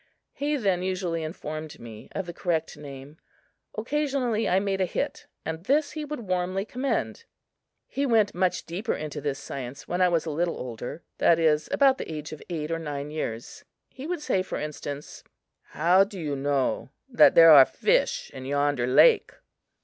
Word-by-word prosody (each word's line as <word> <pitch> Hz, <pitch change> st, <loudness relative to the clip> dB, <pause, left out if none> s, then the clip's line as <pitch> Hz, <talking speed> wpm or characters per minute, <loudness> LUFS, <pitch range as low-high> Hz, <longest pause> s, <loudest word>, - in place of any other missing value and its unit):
He 295 Hz, +1 st, -1 dB
then 195 Hz, -7 st, +1 dB
usually 180 Hz, -3 st, -2 dB
informed 155 Hz, -1 st, -6 dB
me 115 Hz, -2 st, -11 dB
of 195 Hz, -, -3 dB
the 175 Hz, -, -7 dB
correct 165 Hz, -2 st, -2 dB
name. 140 Hz, +1 st, -11 dB, 0.6 s
Occasionally 250 Hz, -2 st, 0 dB
I 185 Hz, -, +4 dB
made 195 Hz, -1 st, -1 dB
a -, -, +3 dB
hit -, -, -3 dB, 0.2 s
and 160 Hz, +2 st, -5 dB
this 290 Hz, +4 st, +2 dB
he 305 Hz, -1 st, -5 dB
would 295 Hz, -3 st, -5 dB
warmly 185 Hz, 0 st, -1 dB
commend. 275 Hz, -, -2 dB, 0.6 s
He 280 Hz, +1 st, -1 dB
went 220 Hz, -4 st, +3 dB
much 180 Hz, 0 st, 0 dB
deeper 190 Hz, +8 st, -3 dB
into 150 Hz, -1 st, -5 dB
this 140 Hz, -1 st, -2 dB
science 135 Hz, +1 st, -7 dB
when 180 Hz, +1 st, -1 dB
I 180 Hz, -, +5 dB
was 170 Hz, -2 st, +1 dB
a 160 Hz, -, -3 dB
little 170 Hz, +3 st, -1 dB
older, 125 Hz, +5 st, -6 dB, 0.2 s
that 165 Hz, -, +5 dB
is, 155 Hz, -2 st, +2 dB
about 270 Hz, -2 st, +4 dB
the -, -, -5 dB
age 150 Hz, -1 st, -6 dB
of 155 Hz, -, -8 dB
eight 160 Hz, -2 st, -3 dB
or 165 Hz, -, -1 dB
nine 145 Hz, -2 st, -5 dB
years. 120 Hz, -7 st, -5 dB, 0.3 s
He 265 Hz, +3 st, -8 dB
would 350 Hz, -2 st, -3 dB
say, 190 Hz, -, +1 dB
for 185 Hz, -, -4 dB
instance: 145 Hz, -1 st, -6 dB, 0.4 s
"How 175 Hz, +5 st, +4 dB
do 200 Hz, -1 st, -8 dB
you 150 Hz, -4 st, -2 dB
know 135 Hz, -1 st, -1 dB, 0.2 s
that 255 Hz, -, +5 dB
there 165 Hz, -1 st, +9 dB
are 140 Hz, -3 st, +11 dB
fish -, -, 0 dB
in 130 Hz, -, -8 dB
yonder 145 Hz, -2 st, 0 dB
lake?" 450 Hz, -, +5 dB
170 Hz, 180 wpm, -26 LUFS, 150-205 Hz, 0.6 s, are